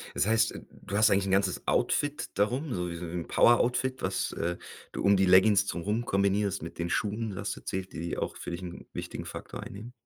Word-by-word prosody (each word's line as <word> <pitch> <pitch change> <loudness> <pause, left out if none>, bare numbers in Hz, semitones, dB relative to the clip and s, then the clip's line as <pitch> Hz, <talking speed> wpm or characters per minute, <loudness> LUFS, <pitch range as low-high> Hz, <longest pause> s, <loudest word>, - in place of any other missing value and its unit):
Das - - +2
heißt, 110 0 +3
äh, - - -8
du 100 - -8
hast 110 - +6
eigentlich 100 0 +3
'n 95 - -1
ganzes 95 -1 +1
Outfit 145 0 +1
darum, 125 +8 0
so 90 -1 -2
wie 85 - -5
so 85 - -6
'n 85 0 -4
Poweroutfit, 125 +2 +3
was, 95 0 -1
äh, 85 +1 -2 0.3
du - - -5
um 100 0 +5
die 95 - +4
Leggings 95 +2 +6
drumrum 105 +6 -2
kombinierst 100 -1 +1
mit 85 - -8
den 85 0 -2
Schuhen. 105 +3 -1
Du 95 - -7
hast 100 0 -3
erzählt, 95 -1 -5
die 80 - -6
die 85 +1 -3
auch - - -3
für - - -6
dich 85 +1 -5
'n 90 -1 -8
wichtigen - - -5
Faktor - - -7
einnehmen? 110 +5 -9
100 Hz, 225 wpm, -29 LUFS, 90-110 Hz, 0.3 s, hast